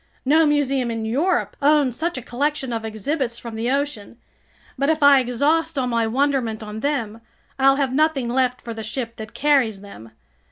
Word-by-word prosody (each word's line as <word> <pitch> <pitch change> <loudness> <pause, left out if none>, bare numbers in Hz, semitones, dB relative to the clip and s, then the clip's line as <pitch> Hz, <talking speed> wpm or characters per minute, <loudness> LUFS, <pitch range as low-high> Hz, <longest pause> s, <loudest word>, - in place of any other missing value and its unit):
No 310 +4 +4
museum 275 -4 +1
in 225 -1 -3
Europe 300 +12 0
owns 285 -3 +3
such 335 +2 -2
a 255 - -6
collection 265 +1 -2
of 225 -1 -3
exhibits 235 +3 -3
from 235 -1 -8
the 225 +2 -2
ocean. 275 -6 -2 0.6
But 275 +2 0
if 315 -2 +1
I 285 -1 +7
exhaust 290 +6 0
all 260 - +1
my 230 -2 0
wonderment 250 -3 0
on 210 0 -7
them, 230 -5 -2 0.4
I'll 270 0 +5
have 275 -2 -1
nothing 300 -3 +1
left 250 +1 0
for 230 - -6
the 225 - -7
ship 230 +2 -5
that 220 0 -9
carries 265 -9 +2
them! 115 - -12
260 Hz, 185 wpm, -22 LUFS, 230-285 Hz, 0.6 s, I